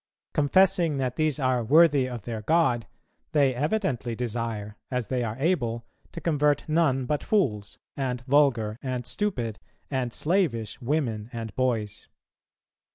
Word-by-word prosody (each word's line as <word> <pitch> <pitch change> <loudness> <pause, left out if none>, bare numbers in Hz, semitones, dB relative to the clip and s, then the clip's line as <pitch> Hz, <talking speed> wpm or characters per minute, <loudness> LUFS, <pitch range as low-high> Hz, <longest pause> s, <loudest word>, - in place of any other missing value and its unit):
Confessing 175 +1 +3
that 130 -2 -1
these 155 -2 +1
are 130 -4 +1
worthy 145 0 +5
of 120 -4 -6
their 115 -1 -5
God, 125 -4 +2 0.5
they 140 -4 +4
evidently 140 - -1
desire, 115 -3 -4
as 125 -3 -2
they 125 -2 0
are 110 0 -3
able, 120 -7 0 0.3
to - - -7
convert 150 -3 +1
none 155 -5 +2
but 145 +3 -1
fools, 110 - 0 0.2
and 125 -3 -2
vulgar, 125 -5 +2
and 130 -2 -3
stupid, 125 - -2 0.3
and 130 -3 -1
slavish, 135 - 0
women 120 -5 -1
and 115 -3 -6
boys." 110 -5 -1
130 Hz, 135 wpm, -26 LUFS, 115-150 Hz, 0.5 s, worthy